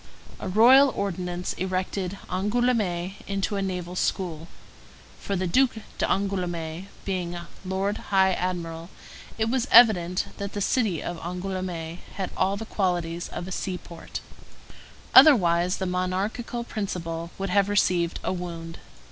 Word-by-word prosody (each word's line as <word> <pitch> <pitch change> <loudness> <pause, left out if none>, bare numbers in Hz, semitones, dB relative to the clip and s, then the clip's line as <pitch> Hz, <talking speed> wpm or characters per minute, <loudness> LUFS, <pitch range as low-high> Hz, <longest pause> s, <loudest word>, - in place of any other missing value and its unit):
A - - -5
royal 250 +8 +7
ordinance 180 -2 -3
erected 185 +1 -2
Angoulême 195 -2 0
into 195 +1 -1
a 200 - -1
naval 180 -2 -3
school; 170 -3 -2 0.7
for 200 - -3
the 185 0 -1
Duc 255 +9 +3 0.2
d'Angoulême, 180 -3 -1 0.2
being 180 -3 -2 0.3
lord 195 +2 -1
high 190 -1 +4
admiral, 170 -2 -3 0.5
it 220 0 +1
was 255 +2 0
evident 185 -6 +6
that 200 -1 -4
the 205 - -3
city 205 - +1
of 175 - -4
Angoulême 180 -1 -4 0.2
had 190 -2 -3
all 195 +1 +1
the 225 - -6
qualities 175 -5 -1
of 175 - -6
a - - -7
seaport; 180 -3 -5 0.9
otherwise 180 - +7
the 190 - -2
monarchical 190 +6 -2
principle 170 -7 -4
would 195 -1 -3
have 200 +1 +3
received 180 -4 +2
a - - -1
wound. 170 -2 -6
185 Hz, 130 wpm, -26 LUFS, 175-200 Hz, 0.9 s, royal